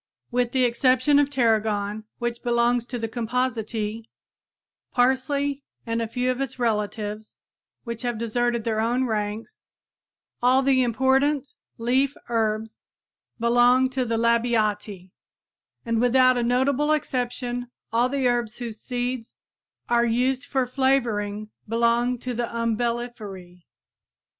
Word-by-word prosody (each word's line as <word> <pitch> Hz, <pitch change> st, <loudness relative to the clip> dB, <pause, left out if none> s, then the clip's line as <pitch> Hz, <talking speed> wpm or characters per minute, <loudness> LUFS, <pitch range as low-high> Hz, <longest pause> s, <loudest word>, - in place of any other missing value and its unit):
With 245 Hz, 0 st, +1 dB
the 260 Hz, -1 st, +2 dB
exception 255 Hz, +3 st, +3 dB
of 290 Hz, -1 st, +2 dB
tarragon, 220 Hz, -4 st, 0 dB
which 240 Hz, -1 st, -3 dB
belongs 240 Hz, 0 st, +1 dB
to 250 Hz, -, -4 dB
the 225 Hz, -1 st, -3 dB
Compositæ, 225 Hz, -2 st, -2 dB, 0.9 s
parsley 275 Hz, +3 st, +1 dB, 0.2 s
and 230 Hz, 0 st, -1 dB
a 230 Hz, -, -1 dB
few 250 Hz, +2 st, 0 dB
of 255 Hz, +1 st, -3 dB
its 270 Hz, -2 st, -3 dB
relatives 215 Hz, -2 st, -2 dB, 0.5 s
which 235 Hz, -2 st, -5 dB
have 240 Hz, -2 st, -2 dB
deserted 235 Hz, +1 st, 0 dB
their 220 Hz, -1 st, -1 dB
own 240 Hz, +4 st, +1 dB
ranks, 215 Hz, -, -4 dB, 0.8 s
all 255 Hz, +2 st, +4 dB
the 265 Hz, -1 st, +3 dB
important 265 Hz, +4 st, +1 dB, 0.2 s
leaf 260 Hz, +4 st, +1 dB
herbs 220 Hz, -1 st, -1 dB, 0.6 s
belong 245 Hz, +2 st, +4 dB
to 260 Hz, 0 st, 0 dB
the 230 Hz, -2 st, -1 dB
Labiatæ; 215 Hz, -5 st, 0 dB, 0.7 s
and 230 Hz, -1 st, 0 dB
without 255 Hz, +1 st, +5 dB
a 245 Hz, -, 0 dB
notable 265 Hz, +5 st, +2 dB
exception 245 Hz, -3 st, -2 dB, 0.2 s
all 240 Hz, +2 st, +3 dB
the 270 Hz, -1 st, +1 dB
herbs 240 Hz, -2 st, 0 dB
whose 230 Hz, -3 st, -7 dB
seeds 245 Hz, -1 st, -3 dB, 0.5 s
are 235 Hz, 0 st, +3 dB
used 250 Hz, +3 st, +1 dB
for 265 Hz, -2 st, 0 dB
flavoring 230 Hz, -6 st, 0 dB, 0.2 s
belong 235 Hz, +2 st, +2 dB
to 250 Hz, +1 st, -5 dB
the 240 Hz, 0 st, -2 dB
Umbelliferæ. 230 Hz, -6 st, -3 dB
240 Hz, 125 wpm, -24 LUFS, 225-255 Hz, 0.9 s, without